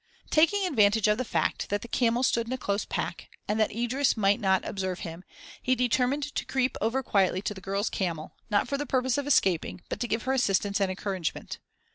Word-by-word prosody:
Taking 355 +6 +4
advantage 220 - +3
of 210 +2 +2
the - - +1
fact - - -1
that 205 0 -1
the - - -7
camels 240 +1 +2
stood 230 -1 +1
in 250 - -3
a - - -2
close 200 -4 -1
pack - - -4 0.2
and 210 +1 0
that 215 - +3
Idris 240 +4 +1
might 200 -1 +3
not 190 -2 +2
observe 190 -2 -3
him, 165 +1 -7 0.4
he 255 - +2
determined 250 +3 +1
to - - -2
creep 260 -1 0
over 245 +5 0
quietly 190 -3 +1
to 210 - -2
the 190 - -11
girl's 195 +3 -1
camel, 165 -5 -3 0.2
not 210 +2 +2
for 280 +2 -2
the 290 - -3
purpose 260 +1 +1
of 285 - -4
escaping, 185 - +2
but - - -4
to 240 - -1
give 225 0 -1
her 260 - 0
assistance 200 -4 +1
and 195 - +2
encouragement. 185 -2 -4
220 Hz, 215 wpm, -28 LUFS, 195-255 Hz, 0.4 s, Taking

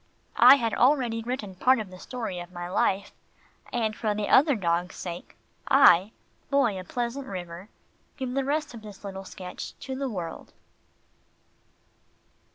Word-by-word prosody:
I - - +10
had 230 -5 -1
already 245 -3 +2
written 225 -4 -4
part 255 +8 +3
of 205 -4 -6
the 185 - -11
story 220 -8 -5
of 175 +1 -9
my 175 -1 -6
life, 195 +1 0 0.6
and 220 -3 -1
for 215 -2 -1
the 210 -1 -2
other 285 0 +5
dogs' 175 -3 -1
sake, 175 -1 -7 0.3
I, 215 -9 +6 0.4
Boy 245 -9 +2
of 185 - -9
Pleasant 245 +3 -3
River, 180 +1 -7 0.5
give 260 -2 -3
the 275 +1 0
rest 295 +2 -1
of 230 - -9
this 210 -2 -12
little 195 -1 -7
sketch 185 -1 -8
to 265 0 -5
the 270 0 -3
world. 175 -7 -6
215 Hz, 155 wpm, -27 LUFS, 185-255 Hz, 0.6 s, I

